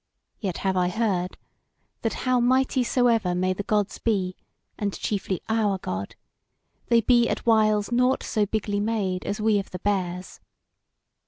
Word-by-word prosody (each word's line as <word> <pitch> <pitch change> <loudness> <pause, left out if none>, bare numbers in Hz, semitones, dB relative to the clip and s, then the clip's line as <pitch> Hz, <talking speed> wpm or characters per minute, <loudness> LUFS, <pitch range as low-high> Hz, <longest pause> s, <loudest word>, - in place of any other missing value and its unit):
Yet 190 -5 -3
have 190 -1 +2
I 180 -1 +2
heard, 185 -3 -1 0.6
that 225 - -1
how 255 -1 +3
mighty 255 +1 +2
soever 230 -7 +2
may 185 +1 +1
the 185 - -4
Gods 205 -1 -1
be, 190 -5 0 0.4
and 200 -2 -3
chiefly 195 -3 -2
our 220 -3 +1
God, 100 - -5 0.7
they 235 -1 +4
be 240 +1 +4
at - - -3
whiles 215 -2 +3
nought 250 +2 +2
so 210 -2 0
bigly 205 -1 -1
made 205 -4 -1
as 205 - -3
we 215 -1 +3
of 195 - -6
the 180 - -6
Bears. 185 -2 -2
205 Hz, 155 wpm, -25 LUFS, 185-230 Hz, 0.7 s, they